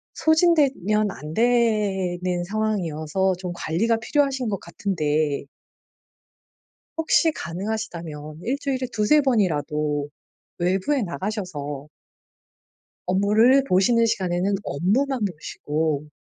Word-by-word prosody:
소진되면 280 - +3
안 150 -3 -8
되는 195 -6 +1
상황이어서 190 -3 -1
좀 180 -1 -5
관리가 195 +8 0
필요하신 270 0 0
것 200 -3 -2
같은데 155 -6 -1 1.5
혹시 325 0 +3
가능하시다면 170 - -5
1 255 +7 -1
주일에 265 -2 -2
2-3 220 +8 +4
번이라도 150 - 0 0.5
외부에 190 +10 +1
나가셔서 170 -8 -4 1.2
업무를 215 +8 +4
보시는 230 +2 +3
시간에는 190 -3 0
업무만 240 - 0
보시고 150 -3 -3
195 Hz, 230 characters per minute, -23 LUFS, 165-230 Hz, 1.5 s, 2-3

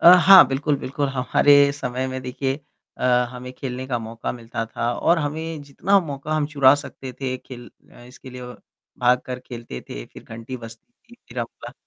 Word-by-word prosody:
अ, 175 - +10
हाँ 190 -4 +9
बिल्कुल, 140 +2 0
बिल्कुल 140 +2 -2
हमारे 140 +2 +4
समय 130 -2 -3
में 130 0 -4
देखिए। 130 +1 -2 0.4
अ, - - -3 0.3
हमें 125 0 -8
खेलने 130 0 -5
का 125 -3 -1
मौका 115 0 -5
मिलता 115 -1 -5
था 115 +1 -2
और 170 +7 +2
हमें 155 +1 -4
जितना 185 +8 +2
मौका 150 -2 -5
हम 150 -2 +1
चुरा 140 -2 +5
सकते 140 -2 -7
थे 130 -1 -2
खेल 120 -1 -11 0.4
इसके 130 +1 -13
लिए 125 0 -9
औ 125 0 -8 0.4
भाग 125 0 +4
कर 125 0 -4
खेलते 115 - -8
थे - - -7
फिर - - -14
घंटी 115 +3 -8
बजती 115 - -12 0.2
थी 240 - -15
फिर - - -8
आपका - - -6
130 Hz, 185 wpm, -23 LUFS, 125-145 Hz, 0.4 s, अ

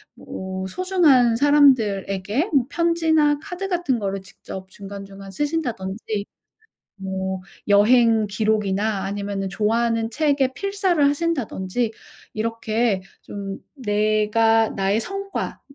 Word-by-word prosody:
뭐 190 0 -6
소중한 295 - +3
사람들에게 250 - +3
뭐 270 -4 +4
편지나 320 -3 +2
카드 390 +1 -5
같은 340 - 0
거를 195 -1 -3
직접 190 0 -10
중간중간 195 0 -10
쓰신다든지 225 -8 -3 0.7
뭐 190 0 -3 0.3
여행 220 +2 +5
기록이나 210 -1 0
아니면은 200 0 -3
좋아하는 225 +3 0
책의 280 -1 +1
필사를 390 -2 0
하신다든지 245 - -1 0.4
이렇게 225 -1 0 0.2
좀 195 -1 -6 0.2
내가 215 -1 +2
나의 195 +2 0
성과 395 - -5
225 Hz, 250 characters per minute, -22 LUFS, 200-290 Hz, 0.7 s, 여행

